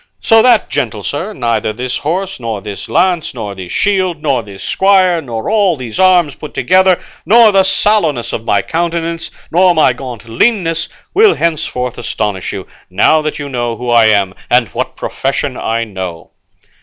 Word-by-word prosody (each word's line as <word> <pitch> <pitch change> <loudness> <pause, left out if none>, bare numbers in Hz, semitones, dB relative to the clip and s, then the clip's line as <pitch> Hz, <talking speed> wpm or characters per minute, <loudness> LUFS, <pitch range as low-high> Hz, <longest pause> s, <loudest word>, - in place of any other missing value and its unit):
So 225 0 +4
that, 240 -2 +3
gentle 110 -7 -2
sir, 165 - -4
neither 115 - -1
this 125 +2 -3
horse, 185 +4 -3
nor 115 -3 -4
this 100 0 -8
lance, 175 -6 +1
nor 105 -4 -5
this 95 -2 -9
shield, 185 -5 0
nor 140 -5 +1
this 100 -3 -11
squire, 185 -3 +3
nor 115 -6 -5
all 200 -6 +2
these 120 -4 -7
arms 180 -6 +4
put 150 - -10
together, 185 0 +3 0.2
nor 220 +4 +6
the 195 -1 +4
sallowness 185 - +1
of 115 - -3
my 105 - +1
countenance, 165 -1 -2 0.2
nor 180 +1 +4
my 155 -5 +4
gaunt 120 -4 -9
leanness, 165 - 0 0.2
will 420 +1 +5
henceforth 125 -7 -2
astonish 105 -5 -3
you, 95 -2 -6 0.2
now 105 +12 +3
that 155 0 -3
you 145 - -5
know 120 -3 -2
who 120 +1 -4
I 115 -1 +5
am 100 -3 +2 0.2
and 120 -2 +3
what - - -4
profession - - -3
I 115 +1 -2
follow." 90 -3 -6
145 Hz, 170 wpm, -14 LUFS, 115-185 Hz, 0.2 s, nor